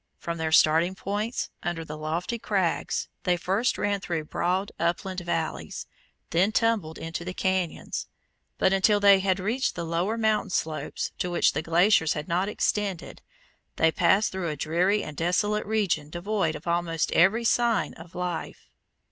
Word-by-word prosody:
From 170 -1 -5
their 160 -1 -1
starting 160 +4 +4
points, 210 +5 -3
under 170 -2 -3
the 150 - -7
lofty 165 +9 -3
crags, 190 -6 -1
they 180 -1 +1
first 195 +7 0
ran 205 -1 0
through 170 -4 -3
broad 185 +5 -1
upland 180 +3 -1
valleys, 165 - -3 0.5
then 185 +5 +3
tumbled 215 -9 +1
into 165 +1 -5
the 185 +1 -6
cañons; 185 -3 -2 0.5
but 190 - +3
until 205 +2 +4
they 200 -1 +7
had 190 0 +1
reached 230 +8 -1
the 170 - -4
lower 175 +7 -1
mountain 215 -2 +1
slopes, 160 -3 -2
to 180 - -1
which 175 - +2
the - - -1
glaciers 165 +1 +3
had 150 0 -5
not 185 +3 0
extended, 205 -4 -2 0.5
they 160 0 +3
passed 200 +5 +3
through 190 -3 -3
a 150 - -3
dreary 180 +8 +1
and 150 -2 -8
desolate 205 +5 0
region 190 -9 0
devoid 175 -1 -1
of 150 - -9
almost 170 -1 0
every 195 +7 +4
sign 230 -8 +2
of 165 +1 -13
life. 180 -1 -5
180 Hz, 160 wpm, -26 LUFS, 165-205 Hz, 0.5 s, they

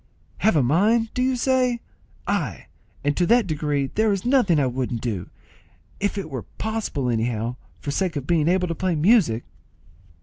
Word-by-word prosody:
"Have 220 - +3
a 145 - +4
mind, 215 - +2
do 250 - -1
you 260 0 +2
say? 250 -1 +1 0.5
Ay, - - -2 0.4
and 145 0 +1
to 175 - +1
that 235 0 +4
degree 150 -4 -1
that - - -9
there 220 0 +2
is 195 0 -2
nothing 245 - +3
I 140 - +2
wouldn't 125 -2 -2
do, 100 -8 -3 0.7
if 205 +1 -1
it 195 - -3
were 130 -4 -5
possible 220 - -2
anyhow, 115 0 -1 0.3
for 145 - -3
sake 180 +3 -1
of 140 -2 -3
being 160 -1 +2
able 180 +1 +2
to 165 - -2
play 180 +1 -1
music." 155 - +3
170 Hz, 180 wpm, -23 LUFS, 135-220 Hz, 0.7 s, a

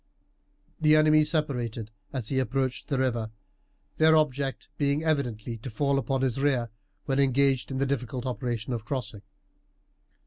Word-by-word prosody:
The 155 -1 +5
enemy 155 0 +5
separated 125 -8 -2 0.2
as 125 -5 -3
he 135 - +1
approached 130 -1 -1
the 140 - 0
river, 120 -4 0 0.7
their 160 0 +6
object 140 -4 0
being 145 +1 +1
evidently 120 -7 -1
to 115 +4 -7
fall 140 +4 +1
upon 135 -1 -1
his 130 -1 0
rear 125 -5 +1 0.3
when 135 -1 0
engaged 135 -1 +2
in 135 - -3
the 135 - +1
difficult 125 -2 -3
operation 125 -2 -3
of 115 -3 -3
crossing. 115 -5 -4
135 Hz, 145 wpm, -27 LUFS, 120-140 Hz, 0.7 s, their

